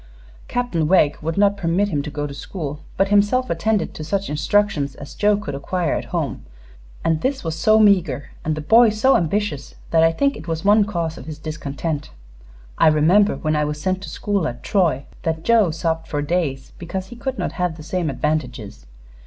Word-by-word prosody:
Captain 215 -11 -1
Wegg 155 -4 +4
would 160 +3 -3
not 200 0 +4
permit 195 +2 0
him 150 -6 -1
to 150 - -6
go 145 0 -3
to 145 - -6
school, 150 -1 -6 0.2
but 195 +1 +2
himself 205 +5 +3
attended 210 +5 0
to 155 - -7
such 195 +2 -2
instructions 150 -2 +1
as 140 - -10
Joe 205 0 +2
could 210 -6 -5
acquire 165 +4 -1
at - - -2
home, - - -3 0.6
and 160 -1 +1
this 265 +1 -1
was 165 -2 -3
so 215 +7 +4
meager 180 -10 +3
and 155 0 -1
the 155 - -4
boy 225 +9 +6
so 220 +6 +3
ambitious 170 -4 -1 0.2
that 165 - +4
I 165 0 +5
think 280 +11 +1
it - - -10
was 165 +1 -3
one 205 +1 +5
cause 170 -5 -3
of 130 - -11
his 155 -2 -6
discontent. 155 0 -4 0.7
I - - +6
remember, 165 +7 +4
when 155 0 -1
I 150 - +2
was 150 0 -3
sent 185 +3 -1
to - - -7
school 200 -5 -1
at 120 -2 -7
Troy, 165 -9 +1 0.2
that 160 -1 -2
Joe 225 -4 +4
sobbed 165 0 -2
for 145 -2 -2
days 145 -4 -2
because 185 +2 -5
he 240 - -9
could 260 +2 -4
not - - -2
have 180 -3 -2
the 155 - -10
same 175 0 -2
advantages. 125 - -3
165 Hz, 200 wpm, -21 LUFS, 150-205 Hz, 0.7 s, boy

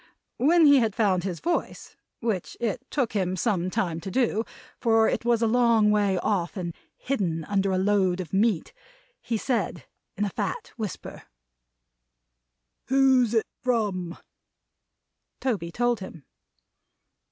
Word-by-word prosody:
When 320 +5 +5
he 285 -2 +7
had 225 -4 0
found 190 -6 +2
his 185 -3 -4
voice 340 0 -3 0.3
which 220 -7 -2
it 235 +1 -2
took 260 -6 -1
him 185 -3 0
some 185 -2 0
time 170 -3 -2
to 190 - -6
do, 225 -1 +1 0.4
for 225 -2 +3
it - - -1
was 235 -1 +2
a - - +3
long 230 -2 +4
way 205 -3 +2
off 180 0 -1
and 170 -2 -4 0.2
hidden 180 -11 -2
under 195 -1 0
a 185 - +1
load 190 -2 +2
of 185 -1 -6
meat 200 -3 +1 0.5
he 230 - -2
said 215 - -2 0.3
in 205 - +1
a 200 - -3
fat 485 - -4
whisper: 215 -7 -6 1.7
"Who's 260 -3 +4
it 225 - +2 0.2
from?" 205 -8 -1 1.2
Toby 200 -10 -2
told 240 +2 0
him. 175 -6 -9
210 Hz, 140 wpm, -26 LUFS, 185-240 Hz, 1.7 s, he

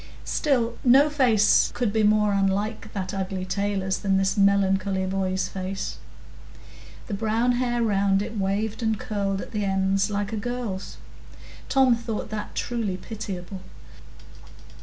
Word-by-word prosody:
Still, 240 -6 0
no 275 +4 +6
face 235 -8 +4
could 240 -4 0
be 220 - +2
more 210 -1 +3
unlike 200 +3 -1
that 190 -1 -4
ugly 190 -1 -3
tailor's 195 0 -1
than 195 -2 +1
this 195 0 +1
melancholy 195 -1 +2
boy's 190 -1 -1
face,—the 190 +1 -5 1.1
brown 225 +4 +1
hair 240 -1 0
round 200 -2 +2
it 220 - -7
waved 205 +3 -1
and 220 -2 0
curled 200 -2 -2
at - - -9
the 210 -2 -2
ends 195 +1 +1
like 205 +1 -2
a - - -1
girl's: 230 -4 -4 0.7
Tom 265 -3 +4
thought 230 -2 -5
that 210 -1 -5
truly 225 -6 -2
pitiable. 190 -2 -7
205 Hz, 135 wpm, -25 LUFS, 195-225 Hz, 1.1 s, no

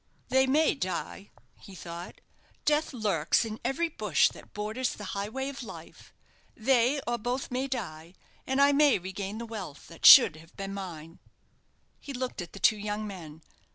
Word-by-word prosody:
"They 265 0 +3
may 305 +4 +3
die," 195 -3 -5 0.3
he 195 - -13
thought; 170 0 -9 0.4
"death 300 +1 +2
lurks 210 - +1
in 220 -1 -6
every 270 +7 0
bush 210 - +2
that - - -15
borders 215 +5 -3
the 210 - -9
highway 220 +7 -3
of 280 0 -6
life. 240 - -11 0.5
They 250 +3 +3
or 240 0 -1
both 245 +4 -3
may 255 +2 -1
die, 175 -9 -6 0.3
and 265 +1 0
I 280 0 +6
may 285 -1 +4
regain 190 +3 -6
the 235 - -5
wealth 200 -10 -8
that 165 - +2
should 200 - +10
have 165 +1 -17
been 195 0 -5
mine." 170 -4 -8 0.8
He 280 - -8
looked 255 -5 -4
at 175 - -9
the 200 - -9
two 215 - +4
young 210 +1 -4
men. 165 -6 -9
215 Hz, 170 wpm, -28 LUFS, 185-260 Hz, 0.8 s, should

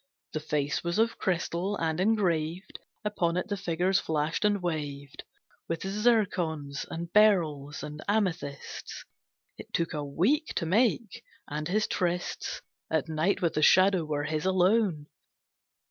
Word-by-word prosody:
The 155 - -1
face 150 -2 -1
was 170 +1 -1
of 225 +1 +1
crystal, 185 +2 -1
and 160 0 -1
engraved 180 -4 0 0.3
Upon 175 -5 0
it 180 - -2
the 205 - 0
figures 185 0 +1
flashed 155 +3 -1
and 205 -1 +3
waved 145 -5 -4 0.4
With 165 - -3
zircons, 185 -9 0
and 170 +1 -6
beryls, 160 -9 +3
and 150 +1 -7
amethysts. 180 -9 -2 0.5
It - - -10
took 170 +1 0
a 150 -1 -2
week 210 - +1
to 170 - 0
make, 230 +4 +1 0.2
and 150 +1 -4
his 215 +4 +1
trysts 175 -1 -2 0.3
At 160 0 0
night 160 +5 0
with 165 -2 +2
the 155 - 0
Shadow 185 +2 +5
were 150 -1 -2
his 155 +4 -1
alone. 185 -3 +2
170 Hz, 140 wpm, -29 LUFS, 155-200 Hz, 0.5 s, Shadow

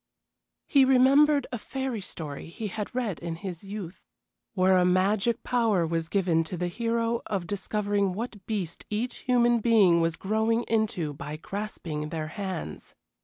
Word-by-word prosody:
He 275 -2 +5
remembered 275 +2 +5
a 245 - -3
fairy 265 -2 -3
story 155 -5 -7
he 210 +5 -5
had 210 +4 -5
read 225 -9 -1
in 170 -1 -4
his 180 0 -7
youth, 195 -3 -7 0.5
where 185 0 +4
a - - +4
magic 195 +5 +2
power 225 -8 +2
was 165 0 -2
given 175 -5 +2
to 175 +3 -5
the 175 +1 -1
hero 230 +3 -1
of 195 -5 -2
discovering 205 0 -1
what 215 -1 -6
beast 195 -7 -3
each 225 +4 -2
human 240 -2 +3
being 205 -7 +5
was 165 0 +1
growing 220 +5 +1
into 215 -10 0
by 145 +2 -6
grasping 165 -5 -5
their 155 -1 -4
hands. 185 - -6
200 Hz, 155 wpm, -27 LUFS, 170-230 Hz, 0.5 s, He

